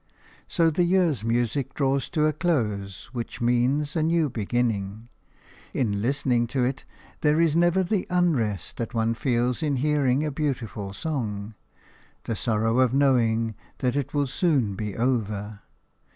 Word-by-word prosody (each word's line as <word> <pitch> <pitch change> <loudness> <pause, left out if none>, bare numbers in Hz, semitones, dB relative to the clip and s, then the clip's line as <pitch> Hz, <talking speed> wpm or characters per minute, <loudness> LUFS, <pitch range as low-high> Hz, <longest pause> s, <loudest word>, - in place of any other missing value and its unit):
So 165 -1 +2
the 170 - 0
year's 175 - +2
music 120 +3 -1
draws 135 -1 0
to 155 - -1
the 155 0 +3
close 115 - -2
which 120 -2 -5
means 125 +5 +1
a 160 - +1
new 160 -2 +2
beginning. 110 -1 -2 0.7
In 100 -6 0
listening 125 -1 +1
to 130 +2 0
it 130 +2 -2 0.3
there 150 +1 +2
is 165 -2 +3
never 175 +2 +3
the 185 +1 -1
unrest 135 - 0
that 115 +1 -4
one 115 0 +1
feels 120 +1 0
in 150 -3 +1
hearing 145 0 +2
a 150 - -1
beautiful 125 -9 -3
song 110 -7 -3 0.4
– - - -31
the 115 - -3
sorrow 115 +2 +1
of 130 0 +3
knowing 115 -5 +2 0.2
that 125 0 0
it 145 -3 -1
will 145 -1 +1
soon 135 - +1
be 105 0 -5
over. 110 -4 -1
125 Hz, 150 wpm, -25 LUFS, 115-150 Hz, 0.7 s, the